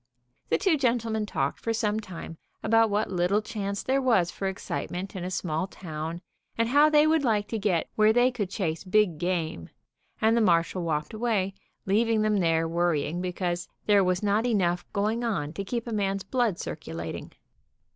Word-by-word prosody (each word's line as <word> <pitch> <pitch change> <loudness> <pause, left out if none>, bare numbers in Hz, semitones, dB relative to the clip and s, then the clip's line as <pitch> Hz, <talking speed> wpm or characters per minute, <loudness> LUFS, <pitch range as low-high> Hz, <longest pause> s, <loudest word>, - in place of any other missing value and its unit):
The - - +3
two 365 -6 +2
gentlemen 230 -5 0
talked 140 -8 -1
for 230 - -1
some 215 -1 0
time 175 -5 -8 0.2
about 225 0 +4
what 210 0 0
little 180 +3 +2
chance 200 -2 -4
there 270 +1 +1
was 210 -10 +3
for 195 - -3
excitement 190 0 -4
in 185 - -4
a 180 - -3
small 175 -1 -2
town, 165 -2 -6 0.4
and 230 0 +1
how 290 +4 +6
they 300 0 +5
would 315 -1 +3
like 210 -4 +1
to 225 - -2
get 190 -5 +1
where 215 0 +4
they 245 +3 +4
could 210 -7 -3
chase 170 -5 -2
big 190 -4 +2
game, 165 - -2 0.5
and 220 +1 +3
the 235 - +3
marshal 175 -2 +2
walked 155 +3 -2
away, 215 -4 0 0.3
leaving 220 +2 +2
them 215 -1 +2
there 165 -3 +2
worrying 170 0 0
because 180 -1 -2 0.2
there 205 -2 +5
was 185 +1 0
not 210 +3 +2
enough 180 -6 0
going 215 +3 0
on 160 -10 -2
to 195 - -4
keep 235 +4 -3
a 235 - -4
man's 195 -2 -1
blood 240 -8 0
circulating. 80 - -6
200 Hz, 180 wpm, -27 LUFS, 175-225 Hz, 0.5 s, how